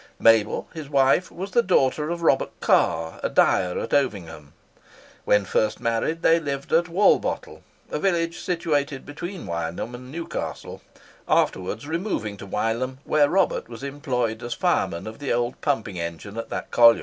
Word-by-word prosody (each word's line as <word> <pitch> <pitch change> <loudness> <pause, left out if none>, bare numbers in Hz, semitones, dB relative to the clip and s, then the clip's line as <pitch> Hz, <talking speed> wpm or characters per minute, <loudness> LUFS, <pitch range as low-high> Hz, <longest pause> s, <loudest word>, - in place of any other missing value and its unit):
Mabel, 115 -2 +3
his 155 -4 -7
wife, 140 +5 +3
was 190 +3 -6
the 240 - +4
daughter 150 - +2
of 170 0 -3
Robert 135 -4 +1
Carr, 80 0 +2
a - - -1
dyer 90 -1 +3
at - - -4
Ovingham. 90 - -1 0.7
When 105 -1 +3
first 105 +3 0
married, 115 +9 -1
they 165 +1 +5
lived 140 -3 -4
at 170 +1 +3
Walbottle, 190 +5 +1 0.3
a - - -1
village 170 -3 0
situated 150 -6 -1
between 175 +5 -7
Wylam 85 +7 -4
and 125 +1 -9
Newcastle, 165 +2 -5 0.5
afterwards 105 +8 0
removing 160 - -2
to 100 - -9
Wylam, 115 +6 -1
where 145 -2 +3
Robert 190 -8 +1
was 115 +2 -9
employed 125 -5 -2
as 120 -1 -4
fireman 85 - 0
of 110 +3 -8
the 145 - -3
old 120 +1 -1
pumping 110 -9 -1
engine 85 +5 -6
at 115 0 -5
that - - -5
colliery. 115 -1 +7
130 Hz, 160 wpm, -24 LUFS, 110-160 Hz, 0.7 s, colliery